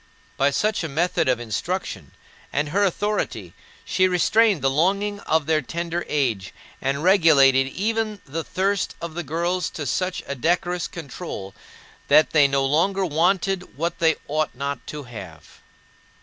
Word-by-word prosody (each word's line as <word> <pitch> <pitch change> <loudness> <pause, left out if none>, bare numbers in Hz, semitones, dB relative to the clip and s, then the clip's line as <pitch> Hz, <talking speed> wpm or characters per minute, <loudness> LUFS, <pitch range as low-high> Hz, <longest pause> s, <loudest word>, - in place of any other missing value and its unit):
By 140 - +3
such 210 +8 0
a 160 - -3
method 160 -1 +1
of 125 -2 +2
instruction, 120 - -4 0.4
and 145 +1 -1
her 200 +6 +2
authority, 190 - -1 0.3
she 185 - +2
restrained 190 - +3
the 135 - +4
longing 200 +7 +1
of 160 -2 +2
their 155 0 +2
tender 170 +4 -3
age, 115 -11 -1 0.3
and 140 +2 -1
regulated 145 -8 +5
even 215 +6 -2
the 160 +4 -4
thirst 195 +2 -1
of 170 -1 -6
the 175 - -3
girls 170 +4 -1
to 150 - -6
such 180 +7 -1
a - - -4
decorous 170 +3 0
control 140 - -7 0.5
that 155 - +5
they 150 -3 +5
no 135 0 +1
longer 190 +7 +2
wanted 180 +1 0
what 170 +2 -2
they 160 -2 +3
ought 155 -1 -1
not 140 +2 -4
to 150 -1 -6
have. 95 - -11
160 Hz, 150 wpm, -23 LUFS, 140-185 Hz, 0.5 s, regulated